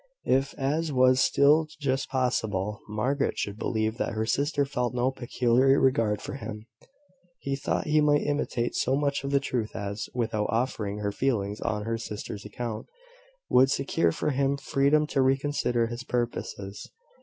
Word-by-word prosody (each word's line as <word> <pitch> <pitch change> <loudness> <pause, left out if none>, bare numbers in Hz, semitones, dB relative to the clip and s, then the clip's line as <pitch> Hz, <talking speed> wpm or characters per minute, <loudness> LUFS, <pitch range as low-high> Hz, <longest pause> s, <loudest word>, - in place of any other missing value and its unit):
If, 135 +2 +1
as 150 +4 -1
was 130 -1 +4
still 150 +4 +4
just 135 -2 -1
possible, 110 -5 -1
Margaret 130 +7 0
should 100 +1 -3
believe 110 0 -1
that - - -1
her 110 0 -1
sister 140 +4 +1
felt 125 -3 -2
no 125 +2 +1
peculiar 130 +1 +2
regard 115 -5 +2
for - - -5
him, 110 -5 -7 0.7
he 140 0 -3
thought 135 - -2
he 150 0 +3
might 145 -1 +3
intimate 145 -5 -1
so 130 - +1
much 140 -1 0
of 140 - -2
the 140 0 +3
truth 125 -5 -3
as, 100 0 -4
without 110 -3 0
offending 110 -3 -1
her 100 - 0
feelings 105 -4 -1
on 105 -2 -1
her 115 +1 -2
sister's 105 -2 -6
account, 110 +1 -5 0.6
would 130 +1 +5
secure 85 -11 +1
for 150 - -1
him 140 +1 +1
freedom 140 +2 +2
to 140 -2 0
reconsider 130 -3 +1
his 120 +2 -5
purposes. 120 -5 -4
125 Hz, 160 wpm, -27 LUFS, 110-140 Hz, 0.7 s, would